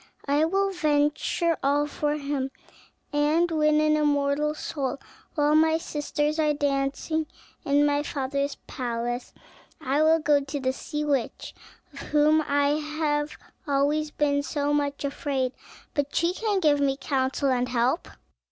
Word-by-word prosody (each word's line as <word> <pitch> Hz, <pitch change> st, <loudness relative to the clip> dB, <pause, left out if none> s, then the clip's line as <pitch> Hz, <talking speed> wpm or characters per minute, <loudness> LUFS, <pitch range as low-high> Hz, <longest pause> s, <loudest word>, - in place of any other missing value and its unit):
I 290 Hz, +3 st, +3 dB
will 390 Hz, +3 st, +1 dB
venture 310 Hz, 0 st, +1 dB
all 285 Hz, +2 st, +2 dB
for 295 Hz, 0 st, -1 dB
him, 280 Hz, -2 st, -2 dB, 0.6 s
and 300 Hz, +4 st, +3 dB
to 325 Hz, -, -2 dB
win 305 Hz, 0 st, +4 dB
an 305 Hz, 0 st, +3 dB
immortal 295 Hz, 0 st, +1 dB
soul, 280 Hz, -3 st, -3 dB, 0.4 s
while 295 Hz, -1 st, +3 dB
my 320 Hz, +1 st, +4 dB
sisters 300 Hz, -1 st, -2 dB
are 300 Hz, -1 st, +2 dB
dancing 285 Hz, +2 st, -1 dB, 0.4 s
in 285 Hz, +1 st, +3 dB
my 290 Hz, 0 st, +2 dB
father's 280 Hz, 0 st, -2 dB
palace, 240 Hz, 0 st, -3 dB, 0.5 s
I 285 Hz, 0 st, 0 dB
will 320 Hz, +1 st, +5 dB
go 300 Hz, -2 st, +3 dB
to 280 Hz, +1 st, -4 dB
the 260 Hz, -1 st, 0 dB
sea 300 Hz, +2 st, -4 dB
witch, 275 Hz, -5 st, -2 dB, 0.4 s
of 280 Hz, -, -10 dB
whom 300 Hz, +2 st, +3 dB
I 285 Hz, 0 st, +2 dB
have 300 Hz, -1 st, -2 dB, 0.3 s
always 290 Hz, +2 st, +1 dB
been 285 Hz, -1 st, +1 dB
so 290 Hz, 0 st, -1 dB
much 285 Hz, -1 st, -1 dB
afraid, 275 Hz, -2 st, -1 dB, 0.4 s
but 285 Hz, -1 st, -2 dB
she 335 Hz, +1 st, +2 dB
can 410 Hz, -1 st, -1 dB
give 295 Hz, -3 st, +4 dB
me 270 Hz, -1 st, +1 dB
counsel 270 Hz, 0 st, 0 dB
and 250 Hz, 0 st, 0 dB
help." 250 Hz, +6 st, +1 dB
290 Hz, 145 wpm, -26 LUFS, 280-305 Hz, 0.6 s, will